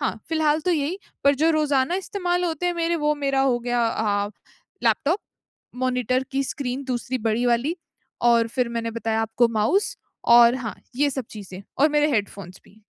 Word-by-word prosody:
हाँ, -, -, -2 dB
फ़िलहाल 315 Hz, -1 st, +2 dB
तो -, -, +3 dB
यही, 320 Hz, +4 st, -1 dB, 0.3 s
पर 280 Hz, 0 st, +5 dB
जो 315 Hz, +4 st, +3 dB
रोज़ाना 295 Hz, -1 st, +1 dB
इस्तेमाल 360 Hz, -2 st, -1 dB
होते 335 Hz, 0 st, -2 dB
हैं 355 Hz, -, +1 dB
मेरे 340 Hz, 0 st, 0 dB
वो 300 Hz, -, +3 dB
मेरा 275 Hz, -2 st, 0 dB
हो 265 Hz, -3 st, +2 dB
गया 240 Hz, -1 st, 0 dB
अ, 205 Hz, -2 st, 0 dB, 0.6 s
लैपटॉप, 330 Hz, +7 st, +2 dB, 0.6 s
मॉनिटर 255 Hz, 0 st, 0 dB
की 275 Hz, +1 st, +1 dB
स्क्रीन 265 Hz, 0 st, -4 dB
दूसरी 255 Hz, 0 st, -3 dB
बड़ी 225 Hz, +3 st, 0 dB
वाली 245 Hz, +8 st, +1 dB, 0.5 s
और 230 Hz, -1 st, +3 dB
फिर 245 Hz, +1 st, -1 dB
मैंने 230 Hz, -1 st, -3 dB
बताया 225 Hz, -1 st, -1 dB
आपको 225 Hz, +2 st, +2 dB
माउस 360 Hz, -, +1 dB, 0.4 s
और 240 Hz, +1 st, +6 dB
हाँ, 230 Hz, -4 st, -5 dB, 0.2 s
ये 285 Hz, +2 st, +2 dB
सब 265 Hz, -2 st, -4 dB
चीज़ें 195 Hz, -2 st, -9 dB, 0.2 s
और 290 Hz, +3 st, +5 dB
मेरे 295 Hz, 0 st, +2 dB
हेडफ़ोन्स 200 Hz, -4 st, -3 dB
भी। 215 Hz, +2 st, -22 dB
260 Hz, 175 wpm, -23 LUFS, 230-300 Hz, 0.6 s, और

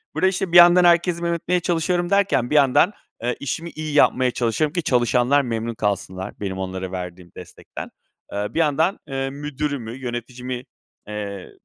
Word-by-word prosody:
Burada, 190 Hz, -, +3 dB
işte, 190 Hz, -1 st, -1 dB
bir 175 Hz, -, +6 dB
yandan 175 Hz, +1 st, +8 dB
herkesi 170 Hz, 0 st, +3 dB
memnun 170 Hz, 0 st, 0 dB
etmeye 180 Hz, +2 st, 0 dB
çalışıyorum 175 Hz, 0 st, 0 dB
derken, 200 Hz, -11 st, +2 dB
bir -, -, -1 dB
yandan, 145 Hz, +7 st, +4 dB, 0.3 s
eee, 120 Hz, 0 st, 0 dB
işimi 160 Hz, +4 st, -4 dB
iyi 155 Hz, -2 st, -6 dB
yapmaya 130 Hz, -3 st, +4 dB
çalışıyorum 125 Hz, +6 st, 0 dB
ki 175 Hz, -, -1 dB
çalışanlar 125 Hz, +1 st, +3 dB
memnun 115 Hz, -2 st, -3 dB
kalsınlar 100 Hz, -3 st, -3 dB
benim 95 Hz, -2 st, -4 dB
onlara 95 Hz, 0 st, -4 dB
verdiğim 90 Hz, -1 st, -7 dB
destekten. -, -, -10 dB, 0.4 s
Eee, 105 Hz, 0 st, -2 dB
bir -, -, -1 dB
yandan, 160 Hz, +4 st, +2 dB
eee, 135 Hz, -1 st, -2 dB
müdürümü, 145 Hz, -3 st, -4 dB
yöneticimi, 125 Hz, 0 st, -5 dB, 0.4 s
eee, 100 Hz, -2 st, -6 dB
135 Hz, 160 wpm, -22 LUFS, 115-170 Hz, 0.4 s, yandan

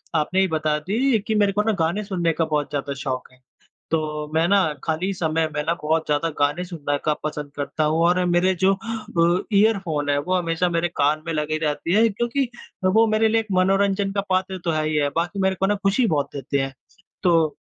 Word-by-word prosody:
आपने 160 Hz, +4 st, +1 dB
ही 190 Hz, -, +3 dB
बता 155 Hz, -2 st, 0 dB
दी 225 Hz, -, +1 dB
कि 220 Hz, -, 0 dB
मेरे 205 Hz, -1 st, +3 dB
को 210 Hz, -, +2 dB
ना 220 Hz, -, +1 dB
गाने 170 Hz, +6 st, 0 dB
सुनने 175 Hz, -4 st, 0 dB
का 165 Hz, -, 0 dB
बहुत 150 Hz, -2 st, -1 dB
ज़्यादा 140 Hz, -1 st, -3 dB
शौक 130 Hz, -1 st, -4 dB
है। 125 Hz, 0 st, -24 dB, 0.5 s
तो 150 Hz, -2 st, -2 dB
मैं 160 Hz, +1 st, +3 dB
ना 200 Hz, -, +5 dB, 0.3 s
खाली 170 Hz, +5 st, -1 dB
समय 160 Hz, -2 st, 0 dB
में 150 Hz, -, -1 dB
ना 165 Hz, +2 st, +1 dB
बहुत 160 Hz, +1 st, 0 dB
ज़्यादा 150 Hz, +2 st, +1 dB
गाने 145 Hz, +5 st, +1 dB
सुनने 155 Hz, -5 st, -3 dB
का 155 Hz, -, +2 dB
पसंद 150 Hz, -1 st, -4 dB
करता 145 Hz, +2 st, -2 dB
हूँ 155 Hz, +2 st, +1 dB
और 180 Hz, +1 st, +2 dB
मेरे 175 Hz, +2 st, +2 dB
जो 195 Hz, +1 st, +5 dB
अ, 190 Hz, -6 st, -1 dB
ईयरफ़ोन 190 Hz, -9 st, +2 dB
हैं 145 Hz, -, +2 dB
वो 180 Hz, +6 st, -1 dB
हमेशा 175 Hz, 0 st, +1 dB
मेरे 170 Hz, 0 st, 0 dB
कान 150 Hz, +2 st, +2 dB
में 165 Hz, -, -2 dB
लगे 155 Hz, 0 st, -1 dB
रहते 150 Hz, +3 st, -2 dB
है, 225 Hz, +3 st, +5 dB
क्योंकि 240 Hz, +5 st, -1 dB, 0.4 s
वो 220 Hz, +5 st, +4 dB
मेरे 220 Hz, +1 st, +2 dB
लिए 225 Hz, +1 st, +2 dB
एक 220 Hz, -, -7 dB
मनोरंजन 195 Hz, +1 st, +2 dB
का 200 Hz, -, 0 dB
पात्र 185 Hz, 0 st, 0 dB
तो 170 Hz, -, +1 dB
है 155 Hz, -1 st, 0 dB
ही 155 Hz, -, 0 dB
है, 145 Hz, -1 st, +2 dB
बाकी 175 Hz, +4 st, -1 dB
मेरे 190 Hz, 0 st, +2 dB
को 195 Hz, -, +3 dB
ना 205 Hz, -, +2 dB
खुशी 220 Hz, +5 st, +3 dB
बहुत 145 Hz, -6 st, 0 dB
देते 140 Hz, 0 st, -2 dB
हैं। 135 Hz, 0 st, -2 dB, 0.5 s
तो 165 Hz, -4 st, +3 dB
170 Hz, 220 wpm, -23 LUFS, 150-195 Hz, 0.5 s, ना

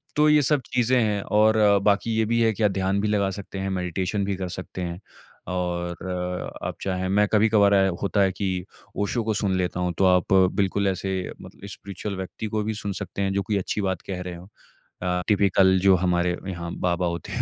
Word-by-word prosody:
तो 150 Hz, +1 st, +4 dB
ये 150 Hz, -1 st, +5 dB
सब 145 Hz, 0 st, +2 dB
चीज़ें 125 Hz, +1 st, +3 dB
हैं 105 Hz, -2 st, 0 dB
और 110 Hz, +1 st, +3 dB, 0.3 s
बाकी 105 Hz, +2 st, +2 dB
ये 110 Hz, -, +2 dB
भी 115 Hz, +2 st, +1 dB
है 110 Hz, -1 st, +3 dB
कि 110 Hz, -, -3 dB
या 105 Hz, -, +6 dB
ध्यान 95 Hz, 0 st, 0 dB
भी 105 Hz, -, 0 dB
लगा 100 Hz, -2 st, +1 dB
सकते 100 Hz, 0 st, -8 dB
हैं 95 Hz, 0 st, -2 dB
मेडिटेशन 95 Hz, +2 st, -2 dB
भी 100 Hz, -1 st, -1 dB
कर 95 Hz, -1 st, -4 dB
सकते 95 Hz, 0 st, -7 dB
हैं। 85 Hz, 0 st, -4 dB, 0.5 s
और 90 Hz, 0 st, -3 dB
आप -, -, -3 dB
चाहें 95 Hz, -1 st, -2 dB
मैं 105 Hz, +1 st, +3 dB
कभी-कभार 105 Hz, -1 st, +4 dB
अ, 95 Hz, -1 st, +4 dB
होता 100 Hz, 0 st, +1 dB
है 95 Hz, -1 st, +3 dB
कि 95 Hz, -2 st, -3 dB, 0.3 s
ओशो 110 Hz, +3 st, 0 dB
को 110 Hz, 0 st, 0 dB
सुन 100 Hz, -2 st, 0 dB
लेता 90 Hz, 0 st, -2 dB
हूँ 90 Hz, -1 st, -1 dB
तो 95 Hz, -, +3 dB
आप 90 Hz, +1 st, +3 dB, 0.2 s
बिल्कुल 100 Hz, 0 st, 0 dB
ऐसे 95 Hz, 0 st, -2 dB, 0.3 s
मत -, -, -11 dB
स्पिरिचुअल 100 Hz, 0 st, -6 dB
व्यक्ति 95 Hz, +3 st, -5 dB
को 105 Hz, 0 st, -1 dB
भी 110 Hz, +1 st, -2 dB
सुन 100 Hz, -1 st, -4 dB
सकते 100 Hz, -, -5 dB
हैं 95 Hz, 0 st, 0 dB
जो 100 Hz, -, +1 dB
कि 105 Hz, -2 st, +1 dB
अच्छी 100 Hz, +2 st, -2 dB
बात 95 Hz, -3 st, -2 dB
कह 90 Hz, -2 st, -4 dB
रहे 90 Hz, -1 st, -6 dB
हों। 90 Hz, +2 st, -12 dB, 0.5 s
अ, 90 Hz, 0 st, 0 dB
टिपिकल 95 Hz, -2 st, +4 dB
जो 95 Hz, -1 st, +6 dB
हमारे 90 Hz, 0 st, +1 dB
यहाँ 85 Hz, -2 st, -5 dB, 0.2 s
बाबा 90 Hz, 0 st, 0 dB
होते 85 Hz, -2 st, -5 dB
हैं -, -, -1 dB
95 Hz, 215 wpm, -24 LUFS, 90-105 Hz, 0.5 s, या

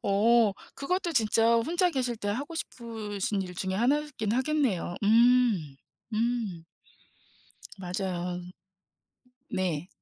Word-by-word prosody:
어 220 Hz, +2 st, +4 dB, 0.2 s
그것도 350 Hz, +4 st, -1 dB
진짜 225 Hz, -1 st, +3 dB
혼자 345 Hz, +9 st, +2 dB
계실 250 Hz, -5 st, -1 dB
때 205 Hz, -2 st, -4 dB
하고 275 Hz, +10 st, -3 dB
싶으신 215 Hz, -7 st, -3 dB
일 180 Hz, -1 st, -8 dB
중에 190 Hz, +1 st, -2 dB
하나이긴 260 Hz, -1 st, 0 dB
하겠네요. 260 Hz, -, 0 dB
음. 225 Hz, -, +4 dB, 0.4 s
음. 220 Hz, -7 st, -1 dB, 1.1 s
맞아요. 180 Hz, -1 st, -3 dB, 1.1 s
네. 180 Hz, -3 st, -2 dB
225 Hz, 200 characters per minute, -28 LUFS, 190-250 Hz, 1.1 s, 어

